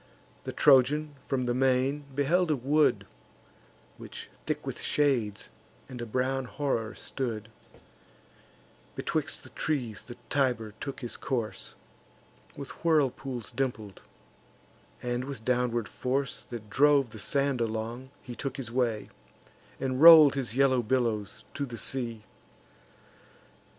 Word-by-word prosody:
The - - -3
Trojan, 145 +2 +4
from 130 -2 0
the 120 - 0
main, 135 +3 +1
beheld 165 +5 +2
a 155 - +3
wood, 145 +4 +2 0.9
Which - - -9 0.2
thick - - -2
with - - -5
shades 120 -8 0 0.4
and 125 -2 -8
a 120 - -4
brown 130 +3 -1
horror 125 -6 -2
stood: 110 -5 -4 1.5
Betwixt - - -2
the - - -13
trees 125 -9 -2
the 120 -1 -11
Tiber 125 -6 0
took 140 0 -6
his 120 - -4
course, 120 -5 -3 0.8
With 140 - -7
whirlpools 135 -6 0
dimpled; 110 -7 -3 1.0
and 120 0 -1
with 130 -5 -7
downward 120 -2 +1
force, 135 +1 -2
That 115 -3 -8
drove 140 +2 +4
the 110 - -9
sand 140 +3 0
along, 115 +3 -3
he 125 - -7
took 135 +2 -5
his 125 -4 -5
way, 120 -4 0 0.7
And 130 0 -1
roll'd 160 -4 +10
his 125 -5 -3
yellow 130 -2 +4
billows 115 -4 -1
to - - -3
the 120 -2 -7
sea. 115 -3 -4
130 Hz, 125 wpm, -29 LUFS, 115-140 Hz, 1.5 s, roll'd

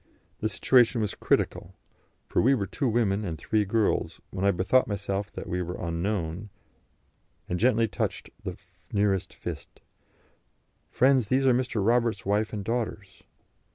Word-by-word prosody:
The 110 - 0
situation 120 +4 +4
was 105 -2 -1
critical, - - -1 0.5
for - - +1
we 135 +3 +4
were 100 -6 -1
two 135 +6 -2
women 110 -3 +1
and 85 -5 -4
three 105 +8 0
girls, 105 +1 0
when 95 0 -4
I 100 - +5
bethought 100 +7 +3
myself 100 0 -3
that - - -6
we 90 +1 -2
were 90 +1 -4
unknown, 85 +2 -3 1.0
and 90 - -2
gently 115 -1 +3
touched - - -3
the - - -5 0.3
nearest 100 -3 +1
fist: - - -7 1.1
"Friends, 130 -3 +3
these 130 +4 +2
are 130 - +5
Mr. 120 -5 0
Roberts' 115 -3 +2
wife 105 +2 +1
and 105 -3 -5
daughters." 110 -4 -3
105 Hz, 150 wpm, -27 LUFS, 95-120 Hz, 1.1 s, I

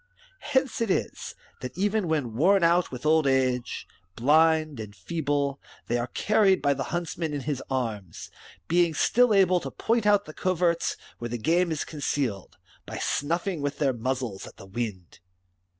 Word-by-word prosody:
^^ - - -37 0.4
Hence 265 -4 0
it 230 - 0
is, - - -2 0.2
that 125 - -7
even 205 0 +1
when 145 -8 -1
worn 185 - +4
out 170 +1 +3
with 125 +2 -8
old 155 -1 +4
age, 130 -2 0 0.3
blind, 155 +1 +3
and 105 -2 -7
feeble, 140 - -2 0.3
they 120 +1 0
are 120 - -2
carried 200 +4 +3
by 140 0 +2
the - - -4
huntsman 170 -3 -3
in 145 - -3
his 140 -1 -3
arms, 110 -9 -4 0.4
being 170 -1 +2
still 245 +8 +3
able 185 -3 +4
to - - -6
point 230 -1 0
out 205 -1 +4
the 155 - -10
coverts 175 -2 0 0.2
where 120 - -4
the 120 - -3
game 170 +8 +2
is 155 - -2
concealed, 135 - -3 0.3
by - - -6
snuffing 170 +3 -1
with 145 0 -2
their 140 -3 +1
muzzles 125 -4 -3
at - - -14
the - - -11
wind. 95 -4 -5
150 Hz, 170 wpm, -26 LUFS, 125-175 Hz, 0.4 s, worn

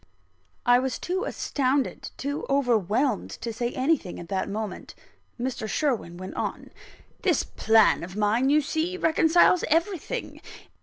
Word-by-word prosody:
I 245 0 +6
was 260 -2 -2
too 370 +2 -2
astounded, 270 -1 -1
too 285 +2 -3
overwhelmed, 245 -2 +1
to 230 -1 -4
say 240 +2 -2
anything 260 - 0
at 170 - -10
that 190 0 -1
moment; 210 -1 -5 0.4
Mr. 240 -3 -3
Sherwin 225 - -1
went 185 +1 -7
on: - - -4 0.5
"This - - +2
plan 220 -1 +3
of 180 +2 -8
mine, 215 +5 +2
you 300 +1 +4
see, 320 +5 -2
reconciles 330 +1 +4
everything. 350 +8 -1
255 Hz, 135 wpm, -26 LUFS, 215-305 Hz, 0.5 s, I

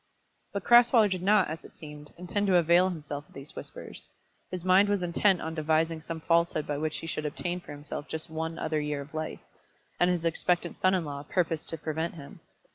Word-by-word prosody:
But 200 -2 -3
Crasweller 240 -3 +6
did 185 -1 -1
not, 210 +3 +4
as 160 +2 -6
it - - -13
seemed, 150 -2 -11
intend 195 +4 -1
to 190 - +4
avail 175 +2 +5
himself 150 -4 -6
of - - -22
these 140 +1 -10
whispers. - - -7 0.4
His 180 -1 -5
mind 190 +2 +5
was 200 -3 +1
intent 180 +2 +2
on 160 - -4
devising 160 +1 +1
some 160 0 -5
falsehood 165 -2 +2
by 145 -1 -2
which 155 0 -2
he - - -7
should 155 -1 -3
obtain 175 +4 -3
for 175 - -12
himself 145 0 -6
just 160 +1 -3
one 160 0 -4
other 155 -1 -1
year 150 -1 -2
of 140 +3 -12
life, 155 0 -4 0.6
and 175 - +4
his 175 -2 0
expectant 175 +2 0
son 185 0 +4
in 175 -3 -1
law 140 -1 -5
purposed 165 +1 -1
to 165 - -3
prevent 160 +2 -3
him. 140 -4 -11
165 Hz, 210 wpm, -29 LUFS, 155-180 Hz, 0.6 s, Crasweller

